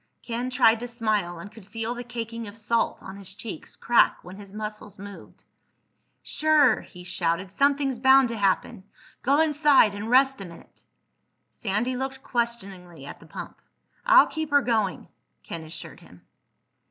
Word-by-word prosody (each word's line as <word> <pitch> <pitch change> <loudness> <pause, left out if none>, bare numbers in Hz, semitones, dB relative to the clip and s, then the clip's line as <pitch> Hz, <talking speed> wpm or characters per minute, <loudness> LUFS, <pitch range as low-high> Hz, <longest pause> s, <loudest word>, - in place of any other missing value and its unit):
Ken 240 +2 -3
tried 225 -3 +4
to 245 - -5
smile, 215 -7 -1
and 205 +5 -10
could 220 - -14
feel 225 +2 -3
the 245 0 -6
caking 230 -1 -6
of 205 +2 -10
salt 230 +1 -1
on 190 +1 -9
his 195 -1 -9
cheeks 210 -7 -8
crack 240 - +3
when 180 +1 -10
his 200 -1 -11
muscles 210 -1 -7
moved. 200 0 -12 0.8
"Sure," 300 -6 +3
he 180 -1 -13
shouted. 180 +1 -2
"Something's 275 0 +1
bound 265 0 +6
to 230 - -4
happen. 200 +1 0 0.4
Go 280 +4 +2
inside 295 -8 +4
and 205 +2 -5
rest 265 -1 +4
a - - -6
minute." 170 -2 -14 0.7
Sandy 230 +5 -2
looked 265 +1 -5
questioningly 195 - -4
at - - -10
the - - -16
pump. - - -9 0.4
"I'll - - +7
keep 315 -1 -4
her 285 -2 +4
going," 220 -5 -1 0.4
Ken 165 -1 -7
assured 160 +1 -10
him. 90 0 -18
225 Hz, 160 wpm, -25 LUFS, 195-250 Hz, 0.8 s, I'll